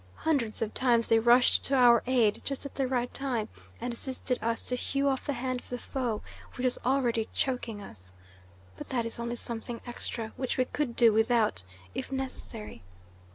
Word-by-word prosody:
Hundreds 250 Hz, -9 st, 0 dB
of 215 Hz, -, -4 dB
times 235 Hz, -3 st, +3 dB
they 225 Hz, -, +6 dB
rushed 240 Hz, +2 st, +5 dB
to 275 Hz, -, +2 dB
our 240 Hz, -3 st, +7 dB
aid 240 Hz, -5 st, +3 dB
just 275 Hz, 0 st, -4 dB
at 280 Hz, -, -6 dB
the 270 Hz, -2 st, 0 dB
right 245 Hz, -1 st, -1 dB
time, 250 Hz, -6 st, -1 dB, 0.3 s
and 240 Hz, +1 st, -3 dB
assisted 255 Hz, +1 st, -2 dB
us 230 Hz, +1 st, 0 dB
to -, -, -2 dB
hew 275 Hz, +3 st, 0 dB
off 270 Hz, +1 st, 0 dB
the 285 Hz, -, +1 dB
hand 255 Hz, 0 st, -2 dB
of -, -, -17 dB
the 245 Hz, -, -3 dB
foe 245 Hz, -4 st, -3 dB, 0.3 s
which 250 Hz, -, -5 dB
was 250 Hz, -, +2 dB
already 245 Hz, -4 st, +1 dB
choking 235 Hz, -5 st, -2 dB
us. 95 Hz, -, -11 dB, 0.7 s
But -, -, -8 dB
that 240 Hz, -3 st, 0 dB
is 230 Hz, -, -3 dB
only 235 Hz, 0 st, -2 dB
something 235 Hz, 0 st, -3 dB
extra, 235 Hz, -2 st, -4 dB
which 260 Hz, -2 st, -2 dB
we 255 Hz, -, +3 dB
could 260 Hz, -3 st, -2 dB
do 230 Hz, -3 st, +6 dB
without, 220 Hz, -, +2 dB, 0.3 s
if -, -, -5 dB
necessary. 260 Hz, -5 st, -5 dB
245 Hz, 190 wpm, -29 LUFS, 230-260 Hz, 0.7 s, our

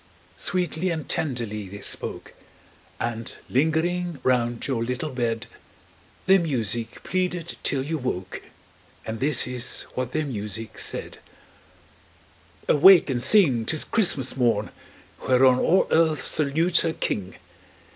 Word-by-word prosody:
Sweetly 180 Hz, 0 st, -1 dB
and 160 Hz, -5 st, -4 dB
tenderly 115 Hz, -8 st, -3 dB
they 100 Hz, +1 st, -9 dB
spoke, -, -, -4 dB, 0.7 s
And 115 Hz, -1 st, -4 dB
lingering 160 Hz, +4 st, 0 dB
round 120 Hz, -2 st, +1 dB
your 125 Hz, -4 st, -1 dB
little 125 Hz, +5 st, -3 dB
bed, 120 Hz, -2 st, -2 dB, 0.8 s
Their 190 Hz, 0 st, +6 dB
music 120 Hz, -, -2 dB
pleaded 180 Hz, -2 st, -2 dB
till 135 Hz, -2 st, 0 dB
you 160 Hz, +1 st, -3 dB
woke, 95 Hz, -8 st, -4 dB, 0.6 s
And 110 Hz, 0 st, -5 dB
this 140 Hz, -1 st, +3 dB
is 125 Hz, -1 st, -2 dB
what 130 Hz, -1 st, -3 dB
their 155 Hz, +2 st, -1 dB
music 110 Hz, -3 st, -5 dB
said: -, -, -2 dB, 1.5 s
"Awake 175 Hz, 0 st, +7 dB
and 120 Hz, -2 st, -1 dB
sing! 135 Hz, -, +4 dB
'tis 155 Hz, +7 st, 0 dB
Christmas 150 Hz, -, +1 dB
morn, 115 Hz, -5 st, +1 dB, 0.6 s
Whereon 130 Hz, 0 st, +5 dB
all 185 Hz, +3 st, +3 dB
earth 160 Hz, -4 st, +2 dB
salutes 160 Hz, +4 st, +1 dB
her 165 Hz, -1 st, -1 dB
King! 95 Hz, -, -3 dB
130 Hz, 120 wpm, -24 LUFS, 115-160 Hz, 1.5 s, Awake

